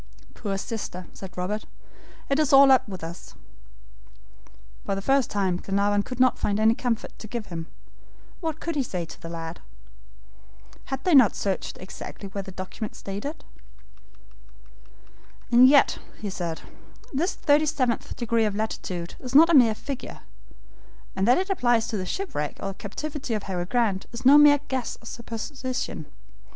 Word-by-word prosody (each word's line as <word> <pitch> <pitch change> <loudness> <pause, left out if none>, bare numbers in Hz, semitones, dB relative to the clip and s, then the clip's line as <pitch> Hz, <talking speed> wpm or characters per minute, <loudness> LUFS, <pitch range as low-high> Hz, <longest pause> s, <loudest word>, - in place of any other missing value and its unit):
"Poor 195 -2 -3
sister!" 195 -4 -5
said 185 -2 -10
Robert. 200 +4 -2 0.6
"It 275 +2 +1
is 305 -3 +2
all 275 0 +8
up 260 -4 +4
with 185 -4 -7
us." 165 +2 -8 1.5
For 195 - -1
the 195 - -3
first 270 +1 +3
time 190 -3 0
Glenarvan 200 +2 +1
could 250 +4 -7
not 255 -1 +4
find 205 0 0
any 220 +1 +5
comfort 235 -1 -2
to 215 - -8
give 230 0 -4
him. 165 -1 -5 0.7
What 320 -3 -3
could 335 -1 -3
he 285 - +2
say 180 -9 -3
to - - -12
the 165 - -7
lad? 165 0 -6 1.3
Had 270 0 -4
they 360 - +2
not 255 -7 +7
searched 195 -2 -2
exactly 190 +1 -8
where 200 +1 -4
the 190 - -9
document 190 +3 -6
stated? 205 +11 -6 2.1
"And 245 +2 +8
yet," 280 0 +5 0.2
he 205 -2 -4
said, 170 -4 -4 0.5
"this 330 +8 0
thirty 300 +1 +3
seventh 260 -6 -1
degree 230 -2 +1
of 210 -2 -1
latitude 185 -5 -4
is 255 0 -7
not 330 +3 +8
a - - +3
mere 240 -7 +6
figure, 275 +3 -7 0.9
and 195 - +1
that 245 - +6
it 380 +1 -1
applies 240 -10 +2
to 220 - -2
the 185 -1 -4
shipwreck 180 - -3
or 195 0 -4
captivity 265 +5 -4
of 210 - -3
Harry 180 -2 -3
Grant, 215 -4 0
is 235 +2 -8
no 285 +3 +9
mere 290 -1 +7
guess 260 -3 -3
or - - -18
supposition. 245 - -5
225 Hz, 165 wpm, -25 LUFS, 195-270 Hz, 2.1 s, no